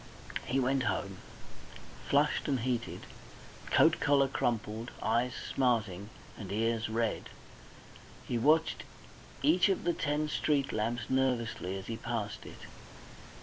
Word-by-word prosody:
He 135 - +1
went 135 +1 +2
home 100 -5 -2 0.9
flushed 145 +2 +2
and 135 -5 +1
heated, 120 -1 -2 0.7
coat - - +4
collar 140 -1 +4
crumpled, 115 -3 -2
eyes 120 +2 +1 0.2
smarting, 110 -7 +1 0.3
and 100 -3 -8
ears 115 +1 0
red. 115 0 -1 1.0
He 120 - 0
watched 155 +6 +3 0.6
each 175 +7 +5
of 195 - 0
the 175 - +2
ten 150 -1 0
street 145 -2 0
lamps 115 +2 -1
nervously 120 -7 0
as 95 - -7
he 115 - -4
passed 115 -4 -4
it. - - -11
120 Hz, 120 wpm, -31 LUFS, 110-140 Hz, 1.0 s, each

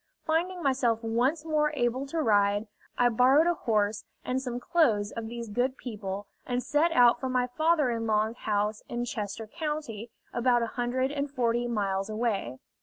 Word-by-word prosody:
Finding 345 +3 0
myself 245 -4 +1
once 250 +8 0
more 300 -1 +1
able 255 +1 0
to 315 +2 -1
ride, 205 -1 +3 0.3
I 245 - +4
borrowed 255 +7 +5
a 345 - +3
horse 215 -7 0 0.2
and 255 +1 -1
some 245 -2 -4
clothes 235 -9 +2
of 230 -1 -5
these 235 0 -6
good 245 +5 -1
people, 205 -4 -5 0.2
and 245 0 -2
set 315 +3 +2
out 245 -4 +5
for 260 - -3
my 250 -1 +1
father 310 +1 +2
in 230 -1 -2
law's 215 +2 +1
house 210 0 -1
in 240 0 -2
Chester 215 -1 -4
County, 270 - -5 0.2
about 240 0 +2
a 230 - -4
hundred 255 +2 0
and 285 0 -2
forty 240 -3 0
miles 200 -3 -1
away. 215 - -2
240 Hz, 175 wpm, -28 LUFS, 220-275 Hz, 0.3 s, borrowed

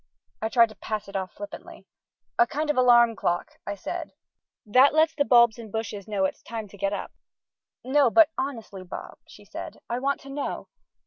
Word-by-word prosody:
I 220 - -1
tried 230 -1 +5
to 215 - -13
pass 210 0 -4
it 200 - -11
off 190 -1 -2
flippantly. 205 0 -10 0.5
"A 235 - +6
kind 300 +3 -1
of - - -4
alarm 240 -2 +5
clock," 175 -3 -2
I 205 - -2
said, 325 - -6 0.5
"that 255 +7 +5
lets 315 +1 +4
the 295 -3 +1
bulbs 235 -2 +5
and 220 -3 -9
bushes 215 -2 -4
know 200 -3 0
it's - - -3
time 225 -2 -6
to 200 - -14
get 200 0 0
up." 205 - -4 0.7
"No; 270 0 +3
but 325 +5 +6
honestly, 225 -8 -5
Bob," 185 - -9
she - - -15
said, - - -8
"I 240 - -1
want 275 +2 0
to 275 - -12
know. 285 +1 -4
230 Hz, 195 wpm, -26 LUFS, 205-275 Hz, 0.7 s, A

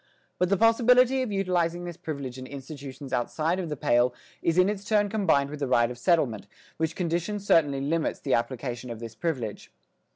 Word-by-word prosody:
But 180 - +2
the 200 - +3
possibility 250 +4 +5
of 250 -4 -2
utilising 175 -3 0
this 175 -1 -6
privilege 140 -7 -6
in 130 - -8
institutions 140 0 -8
outside 160 +8 0
of 175 -3 -3
the 150 - -4
"Pale" 120 -1 +2 0.3
is 165 +1 +1
in 185 +1 +6
its 200 -1 -2
turn 205 -1 +2
combined 190 -10 +2
with 150 - -6
the 140 - -1
"right 120 -1 +3
of 120 - -8
settlement," 130 - +1 0.3
which 160 0 -1
condition 175 +4 -1
certainly 150 -8 +2
limits 155 +3 -1
the 135 - -1
application 120 0 -2
of 115 -2 -6
this 115 -1 -7
privilege. 125 -6 -4
160 Hz, 190 wpm, -27 LUFS, 130-185 Hz, 0.3 s, in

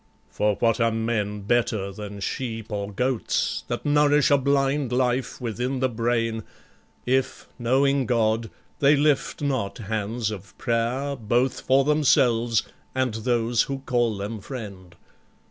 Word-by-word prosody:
For 105 -1 +1
what 115 +2 +1
are 115 - +4
men 110 -2 -1
better 105 -2 0
than 100 0 -8
sheep 115 0 -4
or 100 0 -3
goats 125 +3 -1
That - - -4
nourish 145 0 +4
a 145 - +6
blind 140 -1 +1
life 125 0 0
within 125 +3 -2
the 130 0 +1
brain, 115 -1 0 0.6
If, 130 +1 0
knowing 135 +2 +2
God, 115 -1 +1 0.3
they 145 +1 +5
lift 145 0 +1
not 130 -8 -1
hands 110 +1 -2
of 100 -2 -9
prayer 125 +4 -1
Both 120 +3 0
for 135 +1 +3
themselves 125 -6 +3 0.3
and 130 -3 0
those 115 0 +1
who 135 -1 -4
call 120 -4 +1
them 105 +2 -5
friend? 100 -7 -8
120 Hz, 135 wpm, -25 LUFS, 110-130 Hz, 0.6 s, a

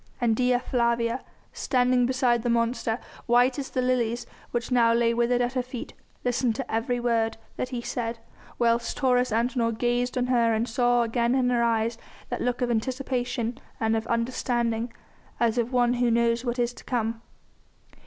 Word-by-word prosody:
And 235 -3 +2
Dea 250 +1 +3
Flavia, 235 -1 0 0.3
standing 250 -1 +2
beside 250 -2 +2
the 240 - -1
monster, 230 -1 +1 0.3
white 245 +3 +4
as 270 - -4
the 255 - -1
lilies 240 -2 0 0.2
which 240 +1 -3
now 235 -2 +4
lay 235 0 +3
withered 240 +1 +2
at 245 +1 0
her 255 - +1
feet, 250 -1 -7 0.3
listened 245 -1 +1
to 265 -2 -5
every 235 +2 0
word 230 -2 0 0.2
that 255 - -3
he 245 -2 -4
said, 230 -1 -3 0.4
whilst 235 0 +1
Taurus 250 -2 +2
Antinor 230 +1 +1
gazed 245 +1 0
on 250 - +1
her 235 -3 +3
and 225 +2 0
saw 245 0 +2
again 235 +2 +1
in 250 -1 +2
her 240 -1 +2
eyes 230 0 +1 0.3
that - - -3
look 250 +1 0
of 245 - 0
anticipation 245 0 -2 0.2
and 220 0 +1
of 220 0 -2
understanding, 235 -1 -1 0.5
as 235 0 +2
of 240 +1 -1
one 245 -1 +3
who 245 -1 +1
knows 235 0 +2
what 245 -1 -2
is 240 0 0
to - - -13
come. 225 -2 -2
240 Hz, 175 wpm, -26 LUFS, 230-250 Hz, 0.5 s, white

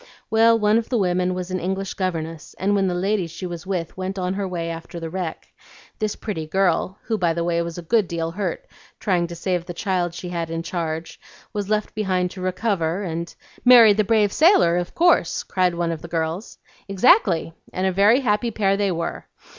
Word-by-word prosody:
Well, 225 +1 +5
one 210 +1 +3
of 230 - -6
the 245 - +1
women 180 -2 +1
was 180 0 -5
an 185 - -1
English 190 +2 -3
governess, 165 -4 -4
and 195 +3 +1
when 195 -1 +2
the 180 - -1
lady 190 0 0
she 165 +3 -7
was 175 -1 -7
with 180 -4 -3
went 190 +1 -4
on 185 0 -1
her 195 0 -2
way 170 -2 -3
after 165 +1 -7
the 165 -1 -6
wreck, 180 -3 -5 0.5
this 215 -2 -1
pretty 160 -8 -5
girl 190 +2 +1
(who 220 -2 -2
by 170 -2 +2
the 170 - -1
way 170 0 +1
was 170 0 -5
a 175 - -6
good 205 +3 +2
deal 165 -1 -3
hurt 205 - -3 0.3
trying 180 -4 +1
to 170 - -8
save 175 0 -2
the 175 - -6
child 180 -3 -1
she 180 - -6
had 170 -2 -3
in 165 0 -3
charge) 165 -2 -4 0.3
was 205 -2 -3
left 215 -1 0
behind 185 -4 0
to 190 - -9
recover, 185 -1 -1
and 170 -1 -4
" - - -25
"Marry 240 -4 +8
the 215 +1 +2
brave 210 -1 +2
sailor 310 - +5
of 175 -1 -4
course," 340 - +3
cried 180 -2 0
one 170 -1 -1
of 160 -2 -5
the - - -8
girls. 165 +4 -3 0.3
"Exactly! 195 - +3 0.2
and 185 - -2
a 190 - +2
very 205 +7 +4
happy 225 -1 +1
pair 200 -3 +1
they 200 -1 0
were. 170 -1 -4
185 Hz, 215 wpm, -22 LUFS, 170-205 Hz, 0.5 s, Marry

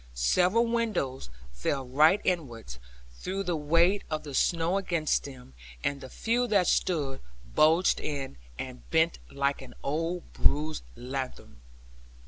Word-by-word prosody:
Several 180 - +3
windows 220 - -1 0.2
fell 130 - -2
right 155 +9 +5
inwards, 120 - -2 0.4
through 195 +2 -3
the 180 -2 -1
weight 170 +6 +3
of 155 -1 -2
the 145 -2 -8
snow 170 +6 +2
against 170 -5 0
them; 130 - -11 0.3
and 140 -1 -1
the 130 - -8
few 240 - 0
that 200 -5 +3
stood, 145 -7 0 0.3
bulged 160 +4 +4
in, 140 - -4 0.2
and 130 -1 -8
bent 160 +1 +2
like 140 0 -1
an 130 - -11
old 165 +5 -2
bruised 155 +2 +1
lanthorn. 130 - -6
155 Hz, 130 wpm, -29 LUFS, 135-180 Hz, 0.4 s, right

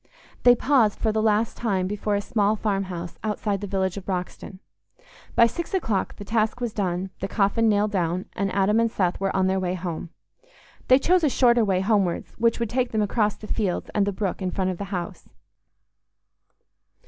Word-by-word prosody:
They 245 0 +7
paused 240 -5 +2
for 220 - 0
the 215 0 0
last 215 +1 +1
time 195 -6 -1
before 205 +1 -1
a 200 - 0
small 210 0 +1
farmhouse 190 -5 -3
outside 210 -2 -2
the 205 - -4
village 190 -1 -1
of 195 - -7
Broxton. 185 0 -4 0.8
By 235 - +7
six 340 +10 -3
o'clock 225 - -1
the 205 - -9
task 220 +2 0
was 240 -3 -3
done, 185 -1 -2
the 195 - -3
coffin 215 +3 +2
nailed 205 0 +2
down, 180 -1 -1
and 195 -1 -2
Adam 200 +3 +2
and 230 0 +2
Seth 180 -5 -1
were 195 0 -1
on 190 -1 +2
their 190 0 +1
way 185 -1 -1
home. 175 -2 -5 0.8
They 255 - +7
chose 355 +5 +2
a 300 - +4
shorter 240 -2 +4
way 190 -3 +1
homewards, 195 -4 0
which 230 0 +2
would 235 -2 -2
take 250 0 0
them 215 -1 +2
across 210 0 +1
the - - -11
fields 205 -4 -2
and 205 -1 +1
the - - +1
brook 195 0 -3
in 185 - -1
front 185 0 -1
of 180 - -7
the 200 - -3
house. 180 -3 -6
205 Hz, 195 wpm, -24 LUFS, 190-225 Hz, 0.8 s, They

